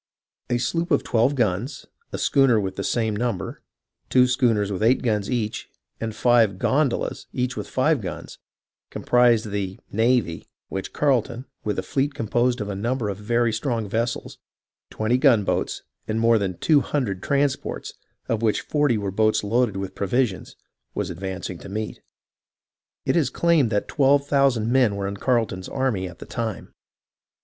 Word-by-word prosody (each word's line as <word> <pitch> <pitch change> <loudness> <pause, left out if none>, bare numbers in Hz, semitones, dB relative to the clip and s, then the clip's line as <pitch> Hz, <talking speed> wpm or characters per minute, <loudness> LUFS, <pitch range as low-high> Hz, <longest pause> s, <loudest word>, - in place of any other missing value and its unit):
A 120 - +2
sloop 165 +9 -1
with 145 - +2
twelve 120 +5 +2
guns, 115 +3 -1 0.3
a - - -3
schooner 135 -5 +3
with 95 -2 -3
the 100 - -3
same 110 -1 0
number, 115 -5 -3 0.5
two 125 -1 +5
schooners 120 -6 +1
with 95 - -3
eight 120 +5 +3
guns 105 -4 0
each, 115 -4 -2 0.3
and 110 -1 -4
five 115 -5 +3
"gondolas," 135 +5 0
each 125 0 -1
with - - -5
five 140 +1 +2
guns, 90 -5 -7 0.5
comprised 120 -3 +2
the 95 -2 -3
"navy," 115 -6 +1 0.2
which 95 - -4
Carleton, 130 -3 0 0.2
with 105 - -2
a - - -1
fleet 140 +1 -1
composed 120 +2 0
of 105 - -3
a 100 - -3
number 115 +2 -1
of 100 - -4
very 115 +1 +1
strong 115 -2 -1
vessels, 115 +3 -3 0.5
twenty 115 +4 0
gunboats, 120 -8 +2 0.2
and 110 +1 -1
more 115 0 +4
than 95 -3 -2
two 150 -3 +4
hun 145 -1 -1
dred 100 -5 -4
transports, 140 -1 -1 0.3
of 115 -1 -1
which 110 -2 +1
forty 145 -6 +1
were 100 -2 -3
boats 110 +2 +2
loaded 110 -1 +1
with 95 -1 -4
pro 100 - -3
visions, 120 -3 -1 0.4
was - - -2
advancing 95 0 -5
to - - -10
meet. 105 +2 -4 1.0
It - - +1
is 155 -7 +2
claimed 165 -5 +2
that 105 -2 -1
twelve 140 0 +3
thousand 135 -6 +2
men 125 -5 +3
were 100 -1 -2
in 100 0 -5
Carleton's 110 -6 0
army 120 -9 -1
at 85 - -13
the - - -10
time. 115 -4 -5
115 Hz, 165 wpm, -24 LUFS, 105-130 Hz, 1.0 s, two